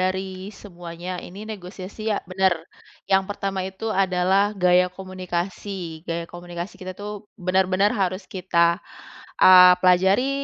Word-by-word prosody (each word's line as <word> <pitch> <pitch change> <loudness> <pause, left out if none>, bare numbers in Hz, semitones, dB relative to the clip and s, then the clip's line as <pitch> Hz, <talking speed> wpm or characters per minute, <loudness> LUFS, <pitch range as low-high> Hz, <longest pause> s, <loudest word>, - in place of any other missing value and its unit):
dari 190 +1 -1 0.2
semuanya 175 -2 -8
ini 200 +4 -9
negosiasi, 200 +1 -7
ya 205 - 0
benar, 190 -1 +2 0.6
yang 190 0 +4
pertama 195 -1 -3
itu 190 +4 -7 0.2
adalah 190 +3 +2
gaya 180 -1 +4
komunikasi. 185 -2 -5
Gaya 170 0 -2
komunikasi 175 +1 -7
kita 185 0 -6
itu 210 0 -8
benar-benar 190 +1 +2
harus 190 -2 -1
kita, 170 -1 +1 0.6
eee, 180 -1 +9
pelajari, 190 +8 +4
185 Hz, 120 wpm, -23 LUFS, 180-195 Hz, 0.6 s, eee